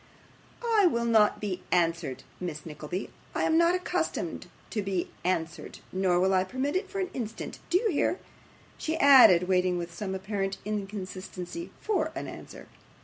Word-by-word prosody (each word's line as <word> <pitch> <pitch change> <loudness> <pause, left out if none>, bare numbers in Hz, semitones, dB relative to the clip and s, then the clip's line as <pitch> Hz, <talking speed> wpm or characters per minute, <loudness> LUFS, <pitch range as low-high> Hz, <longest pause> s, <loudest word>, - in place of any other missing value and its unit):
'I 445 -5 +4
will 235 -7 0
not 220 -3 +4
be 190 -3 -3
answered, 165 -6 +1 0.2
Miss 165 -4 -5
Nickleby. 155 +4 -5 0.2
I - - +1
am 320 - +3
not 340 +2 +5
accustomed 365 - -2 0.2
to 215 - -1
be 190 -3 -2
answered, 170 -2 -2
nor 185 -2 +2
will 190 +1 +3
I 185 -1 +4
permit 260 - -2
it 385 +1 -1
for 395 - -4
an 370 -1 -2
instant. 225 -3 -5
Do 345 - +4
you 430 +2 +1
hear?' 340 +3 +1 0.6
she 320 +1 -1
added, 235 - +8
waiting 180 -1 +2
with 170 0 -5
some 190 +1 -4
apparent 195 0 -2
inconsistency 195 - -5
FOR 340 -7 0
an 335 - -4
answer. - - -10
195 Hz, 160 wpm, -28 LUFS, -, 0.6 s, added